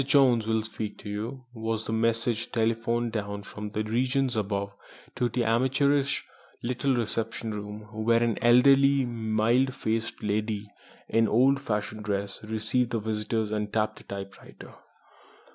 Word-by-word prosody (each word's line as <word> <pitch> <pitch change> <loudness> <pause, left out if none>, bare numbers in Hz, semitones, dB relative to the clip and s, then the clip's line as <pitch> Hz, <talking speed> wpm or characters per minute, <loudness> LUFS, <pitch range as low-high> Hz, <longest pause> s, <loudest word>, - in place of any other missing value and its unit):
Jones 130 -5 +4
will 110 -1 +1
speak 110 -1 -5
to 105 - -9
you," 115 +5 -5
was 110 -1 -3
the 110 - -3
message 115 +1 0
telephoned 115 +1 0
down 100 -2 -4
from 105 0 -7
regions 125 +5 0
above 100 -1 -2 0.4
to 125 - 0
the 120 +1 0
amateurish 135 +4 +2 0.4
little 125 +2 0
reception 115 -1 -2
room, 105 0 -6
where 115 +2 +2
an 115 -2 +1
elderly, 135 +3 +6
mild 120 +3 +1
faced 115 -3 -2
lady 105 0 -2 0.4
in 115 0 +3
old 135 +5 +4
fashioned 105 -3 -3
dress 100 0 -3
received 110 +3 0
visitors 110 0 -1
and 105 -1 -2
tapped 110 -1 0
a - - -15
typewriter. 100 0 -9
115 Hz, 135 wpm, -27 LUFS, 105-120 Hz, 0.4 s, elderly